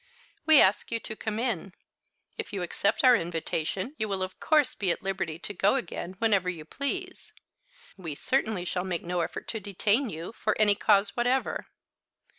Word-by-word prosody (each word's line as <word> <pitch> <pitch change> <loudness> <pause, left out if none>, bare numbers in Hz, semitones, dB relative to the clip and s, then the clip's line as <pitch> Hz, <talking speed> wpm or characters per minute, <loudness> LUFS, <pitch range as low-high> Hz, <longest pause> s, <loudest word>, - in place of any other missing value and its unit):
"We 315 -3 +8
ask 190 +2 +3
you 230 - 0
to 220 - -6
come 215 0 -4
in. 215 -6 -2 0.6
If 445 - -5
you 195 -3 -3
accept 200 +7 0
our 250 -1 +8
invitation 170 - -2
you 215 - -1
will 195 -1 -1
of 185 - -6
course 305 -3 +3
be 195 - -1
at 170 - -1
liberty 190 -5 -2
to 195 +4 -7
go 205 +4 +3
again 185 -6 -4
whenever 200 -4 +2
you 165 -4 -6
please. 370 - -4 0.6
We 165 -6 -5
certainly 220 - 0
shall 180 0 -2
make 180 -3 -3
no 175 0 -1
effort - - -5
to 225 - -2
detain 210 +5 +1
you, 165 +2 -6
for 215 -2 -1
any 210 -1 +6
cause 200 0 +3
whatever." 250 +2 0
200 Hz, 180 wpm, -28 LUFS, 180-235 Hz, 0.6 s, We